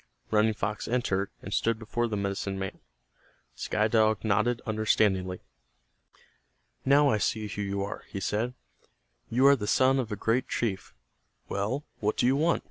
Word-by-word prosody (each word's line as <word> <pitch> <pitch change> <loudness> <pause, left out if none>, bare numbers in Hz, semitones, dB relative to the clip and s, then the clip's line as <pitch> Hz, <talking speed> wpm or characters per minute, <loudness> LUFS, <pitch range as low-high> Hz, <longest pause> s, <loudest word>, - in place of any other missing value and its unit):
Running 110 0 +3
Fox 105 +1 -3
entered, 100 -5 0
and 95 - -5
stood 115 -1 +1
before 120 +2 -2
the 105 -2 -2
medicine 100 0 -2
man. 95 0 -5 0.7
Sky 105 0 0
Dog 110 -1 +2
nodded 110 +3 +2
understandingly. 105 -4 +1 1.4
"Now 140 +2 +5
I 110 - +1
see 110 +2 -1
who 105 0 -5
you 100 0 -2
are," 100 - -6
he 100 - -5
said, 115 +5 -1 0.7
"You 125 +4 +3
are 140 0 +8
the 105 -6 -5
son 130 +3 +4
of 120 -4 -3
a - - -1
great 115 +5 0
chief. 100 - -3 0.5
Well, 110 +9 -2
what 105 0 0
do - - +2
you 130 +2 +4
want?" 165 +4 +2
110 Hz, 160 wpm, -28 LUFS, 100-120 Hz, 1.4 s, are